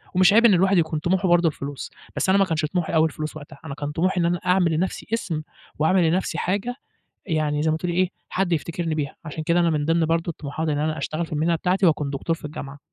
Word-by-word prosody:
ومش 185 +2 +6
عيب 230 +2 +6
إن 225 - +7
الواحد 190 +2 +3
يكون 160 -2 +1
طموحه 185 +4 +1
برضو 175 -1 +4
الفلوس، 140 -2 -5 0.2
بس - - 0
أنا 190 - +5
ما 195 - +4
كانش 160 -3 -1
طموحي 175 +1 -2
أوي 160 0 +5
الفلوس 155 0 -6
وقتها، 145 -2 -12
أنا 140 -3 -5
كان 145 0 -4
طموحي 180 +4 +1
إن - - +2
أنا 175 +1 +1
أعمل 180 -2 +3
لنفْسي 175 +4 -2
اسم 170 -9 -1 0.4
وأعمل 165 +2 +3
لنفْسي 180 -1 -1
حاجة، 205 +8 -1 0.5
يعني 155 -3 0
زي 160 - +2
ما 160 - 0
تقولي 175 +1 -2
إيه، 185 0 +2 0.2
حد 190 -1 -1
يفتكرني 165 +1 -2
بيها، 145 -3 -3
عشان 155 0 -5
كده 170 +2 +2
أنا 170 -1 +3
من 150 -2 0
ضِمْن 165 +1 +2
برضو 165 +1 0
طموحاتي 155 +1 -3
إن - - -1
أنا 155 +1 -1
أشتغل 155 +3 -2
في 160 - -8
المهنة 160 +3 +1
بتاعتي 185 +4 +1
وأكون 150 -4 +2
دكتور 140 +4 -2
في 160 - -11
الجامعة. 145 -1 -7
165 Hz, 240 wpm, -23 LUFS, 155-180 Hz, 0.5 s, إن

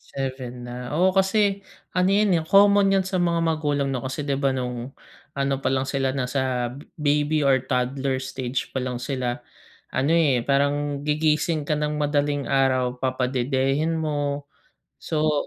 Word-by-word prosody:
7 130 -2 -5
na, 125 +1 -6
oo 185 +3 +4
kasi 195 +1 +2 0.3
ano 180 0 +3
yun, 200 -1 +3
eh, - - -5
common 200 0 +5
yan 190 - -2
sa 190 -1 -1
mga 170 -1 +1
magulang 145 -4 0
'no 130 -3 -3
kasi 130 +3 -4
'di 140 -1 -1
ba 135 -2 +1
nung 125 0 -4 0.4
ano 140 0 0
pa 130 - 0
lang 130 0 0
sila 135 -1 -1
nasa 125 -2 -1 0.3
baby 150 +1 +1
or 135 -2 +3
toddler 130 +1 0
stage 130 -1 -4
pa 130 - -2
lang 125 -1 -3
sila 125 -2 -3 0.5
ano, 135 +4 +1
eh, 145 -8 +3
parang 145 +1 +1
gigising 155 +1 +1
ka 145 - -4
ng 150 0 -1
madaling 145 -1 0
araw 130 -2 +1
papadedehin 130 +4 0
mo. 145 -2 -2 0.6
So 155 -2 0
140 Hz, 155 wpm, -24 LUFS, 130-155 Hz, 0.6 s, common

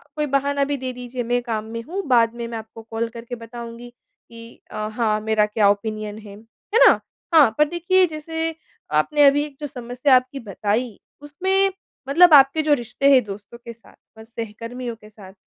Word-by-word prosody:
कोई 300 -1 -1
बहाना 280 0 0
भी 285 0 -2
दे 260 -1 -4
दीजिए, 245 0 -6
मैं 245 +1 0
काम 220 -3 -3
में 230 0 -5
हूँ। 360 +9 -4
बाद 235 -3 +3
में 235 -1 -5
मैं 230 -1 -5
आपको 220 0 -10
कॉल 225 +1 -2
करके 235 +1 -8
बताऊँगी 235 +1 -9
कि 230 -1 -17
अ, - - -9 0.2
हाँ, 215 -2 0
मेरा 215 -1 +2
क्या 210 -1 +2
ओपिनियन 215 +1 -3
है। 205 -2 -12
है 225 - -4
ना? - - +5 0.3
हाँ। 305 -6 +7
पर 300 - +5
देखिए, 360 +2 +2
जैसे 320 +1 -4 0.4
आपने 290 - +3
अभी 285 +1 +3
एक 295 -2 -12
जो 295 - -4
समस्या 250 +1 +1
आपकी 255 +2 0
बताई, 215 +1 -3 0.2
उसमें 380 +7 0 0.4
मतलब 340 +3 +6
आपके 275 +2 +6
जो 305 -1 +2
रिश्ते 245 +1 0
हैं 260 -2 +6
दोस्तों 205 +2 -10
के 235 0 -10
साथ 230 - -22 0.2
और 220 - -11
सहकर्मियों 230 +2 -7
के 210 -1 -17
साथ, 200 -3 -14
240 Hz, 190 wpm, -22 LUFS, 225-285 Hz, 0.4 s, हाँ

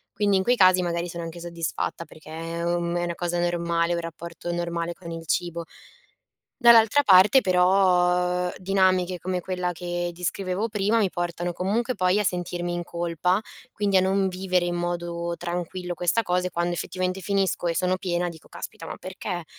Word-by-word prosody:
Quindi 205 -1 +2
in 190 - +1
quei 245 +4 +3
casi 185 -3 +5
magari 170 0 -2
sono 170 0 -6
anche 165 +1 -7
soddisfatta, 170 0 -4
perché 155 - -15
è, 165 +1 -5
uhm, 170 0 0
è - - -1
una 170 - -3
cosa 175 0 -2
normale, 170 0 0
un 170 - -1
rapporto 170 +1 -6
normale 170 0 -2
con 170 -2 -11
il 165 0 -6
cibo. 170 +1 -1 1.0
Dall'altra 235 +2 +6
parte, 195 +5 +7
però, 180 -1 +3
dinamiche 185 -1 +2
come 185 0 -2
quella 180 0 -2
che 175 0 -3
descrivevo 185 +4 -2
prima, 210 +2 +1
mi 205 - +3
portano 175 0 -3
comunque 225 +8 -1
poi 185 0 +2
a 210 - 0
sentirmi 175 -1 -2
in 175 - -2
colpa, 175 +2 0 0.3
quindi 200 -2 +1
a - - +5
non 190 +1 +2
vivere 185 -1 0
in 175 - -1
modo 170 0 -3
tranquillo 175 +1 -4
questa 175 +6 +1
cosa 180 -1 0
e, - - -18
quando 175 0 -1
effettivamente 185 +2 -3
finisco 195 -2 0
e 165 - 0
sono 185 +1 +1
piena, 175 -2 -1
dico: 160 -2 -12
“Caspita, 165 - -8
ma - - -6
perché?”. 185 -2 -5
180 Hz, 180 wpm, -25 LUFS, 170-185 Hz, 1.0 s, parte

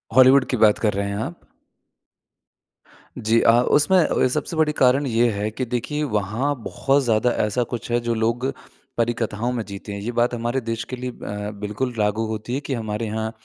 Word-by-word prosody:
Hollywood 130 +1 +7
की 125 - 0
बात 105 -1 +5
कर 105 -2 +1
रहे 100 0 -1
हैं 100 - -3
आप? 105 -5 -4 1.8
जी 110 +2 +2
अ, - - +6
उसमें 150 +8 +3
अ, 160 - +2
सबसे 150 +5 -3
बड़ी 155 -1 +3
कारण 135 +2 +3
ये 120 0 +3
है 105 +1 -2
कि 130 +4 -3
देखिए 125 +5 -2
वहाँ 115 +3 -1
बहुत 140 +4 +1
ज़्यादा 115 0 +2 0.2
ऐसा 105 +4 0
कुछ 120 -1 -5
है 120 - +3
जो 120 0 -1
लोग 115 +3 0 0.5
परी 120 0 +2
कथाओं 115 +1 -2
में 120 -2 -2
जीते 100 +1 -8
हैं। 100 - -5
ये 115 +4 -3
बात 120 +1 +1
हमारे 120 +2 -1
देश 115 0 -3
के - - 0
लिए 125 0 -5
अ, 105 -2 -6
बिल्कुल 105 +5 -3
लागू 105 +2 +1
होती 110 +2 -4
है - - -1
कि 140 - -4
हमारे 110 -1 -3
यहाँ 110 +1 -2
115 Hz, 200 wpm, -22 LUFS, 105-125 Hz, 1.8 s, Hollywood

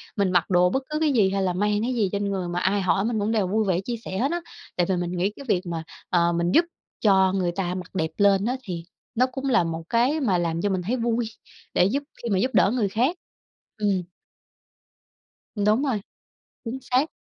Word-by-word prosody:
Mình 200 -3 +1
mặc 175 0 +2
đồ 180 0 +4
bất 265 +8 -1
cứ 305 0 -1
cái 310 -2 +2
gì, 210 -6 +4
hay 195 0 0
là 185 -1 +1
mang 205 +3 +1
cái 250 +3 -1
gì 210 -5 +1
trên 200 0 -1
người 185 -2 -2
mà 175 0 -2
ai 195 +2 +1
hỏi 190 +2 +1
mình 230 -2 0
cũng 210 +2 0
đều 210 -5 +1
vui 215 +2 +1
vẻ 185 -1 +1
chia 240 +4 -3
sẻ 190 - -4
hết 265 +8 +1
á. 345 0 -1 0.3
Tại 175 - +2
vì 190 - +2
mình 175 -1 -2
nghĩ 190 +4 +1
cái 280 - -10
việc 180 - +3
mà, 165 -2 -4 0.3
ờ, 170 -1 +3
mình 170 +1 0
giúp 335 - +5 0.4
cho 190 -3 +4
người 185 -3 0
ta 180 -1 -2
mặc 180 0 -8
đẹp 160 -3 0
lên 200 -1 +4
á, 250 +3 0
thì 175 -6 -5 0.3
nó 250 +2 +4
cũng 265 +1 -6
là 235 -8 +4
một 165 0 -4
cái 250 +7 +2
mà 205 -10 +2
làm 170 -1 -1
cho 205 - +1
mình 185 -1 0
thấy 215 +8 -1
vui, 235 0 0 0.5
để 180 - +4
giúp 275 +8 0 0.2
khi 235 - -2
mà 195 -3 +2
giúp 255 +5 +1
đỡ 190 +1 +4
người 215 -5 +1
khác. 250 - +1 0.6
Ừm. 200 -4 +1 1.5
Ừm, 205 -2 0
đúng 215 +6 +3
rồi. 250 -8 0 0.6
Chính 240 +3 -4
xác. 260 +4 +1
200 Hz, 240 wpm, -25 LUFS, 180-235 Hz, 1.5 s, giúp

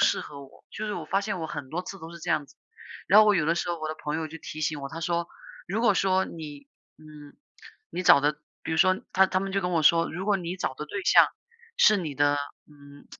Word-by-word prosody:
适 - - +3
合 140 -1 -10
我， 135 - -18
就 215 - -5
是 210 - -3
我 165 - -5
发 195 +4 +1
现 200 -4 -3
我 160 - -3
很 145 -5 -7
多 175 +3 -2
次 195 +1 -8
都 165 +1 -9
是 170 - -10
这 - - -5
样 145 - 0
子。 - - -21 0.5
然 205 +4 +6
后 215 - +5
我 210 - +5
有 150 - +1
的 165 - +2
时 175 - -3
候 170 - -3
我 155 - -3
的 155 - -4
朋 150 +1 -4
友 160 -1 -3
就 165 - -9
提 155 0 -8
醒 150 -1 -1
我， 140 - -5
他 165 - -7
说 170 +1 -1 0.4
如 215 +5 -1
果 210 -4 +4
说 190 0 +2
你 145 -4 -9 0.3
嗯， 150 -2 -14 0.5
你 180 - -4
找 145 - +7
的 145 +1 +2 0.3
比 160 - -4
如 - - 0
说 185 +2 +4
他 190 0 +5
他 185 - +1
们 195 0 -4
就 195 - +1
跟 180 -1 -2
我 165 -3 +1
说： 165 +2 +4
“如 185 +3 -5
果 205 -2 +3
你 180 0 -5
找 130 - -3
的 150 - -6
对 200 +4 -5
象 - - +7 0.5
是 215 - +6
你 160 -7 -4
的， 145 0 +3 0.3
嗯 145 -1 -17
165 Hz, 285 characters per minute, -26 LUFS, 150-190 Hz, 0.5 s, 找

